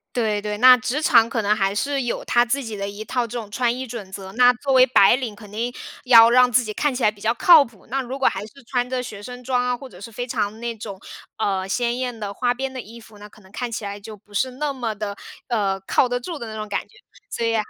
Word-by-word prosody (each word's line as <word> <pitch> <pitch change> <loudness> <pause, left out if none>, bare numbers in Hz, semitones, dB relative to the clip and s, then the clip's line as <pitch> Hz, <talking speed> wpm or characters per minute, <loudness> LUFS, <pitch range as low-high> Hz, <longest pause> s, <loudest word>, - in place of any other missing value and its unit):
对 215 -3 0
对， 210 0 -4
那 255 +2 +8
职 255 +5 -2
场 230 -6 +5
可 230 -1 -1
能 210 +1 +2
还 195 -1 0
是 275 +5 -1
有 240 - -3
它 240 0 +3
自 270 +4 -1
己 225 -4 -6
的 200 0 -4
一 210 +2 -8
套 250 -2 -1
这 235 +1 -6
种 215 -3 -6
穿 240 +2 0
衣 260 0 -5
准 220 -5 -8
则。 190 0 -8
那 250 +1 +6
作 270 +2 -2
为 255 0 +7
白 240 -3 +5
领， 245 -5 -4
肯 205 0 -14
定 235 +4 -3 0.3
要 230 -2 +8
让 250 0 +5
自 245 0 +3
己 215 - -5
看 295 +2 0
起 250 - -4
来 210 - +5
比 205 -1 -12
较 225 +2 +1
靠 320 +3 +7
谱， 230 -6 -17
那 270 +2 -1
如 260 +2 -6
果 270 - +3
还 195 +2 -1
是 - - -14 0.2
穿 250 -1 -1
着 255 -1 -1
学 205 -4 -9
生 250 +1 -8
装 250 0 0
啊， 250 0 -1
或 270 - -10
者 185 -5 -15
是 230 - -9
非 245 +3 -5
常 220 -2 -2
那 235 -1 -4
种， 205 -3 -8 0.4
呃， 195 -3 -1
鲜 240 +3 -1
艳 250 -2 -3
的、 200 -1 -5
花 245 +3 0
边 265 +1 -4
的 255 - -5
衣 230 +3 -13
服， 220 -2 -16
那 210 0 -11
可 - - -20
能 190 - -19
看 245 0 -4
起 215 -2 -4
来 200 0 -5
就 210 +1 -10
不 205 +1 -23
是 255 +6 0
那 285 +2 -3
么 235 -4 -3
的， 200 -1 -5 0.3
呃， 200 -5 0
靠 240 +6 +1
得 245 0 -1
住 325 +5 -6
的 235 - -7
那 220 - -7
种 215 - -5
感 205 - -2
觉。 430 - -22 0.3
所 230 - -3
以 230 0 +1
235 Hz, 305 characters per minute, -22 LUFS, 210-250 Hz, 0.4 s, 那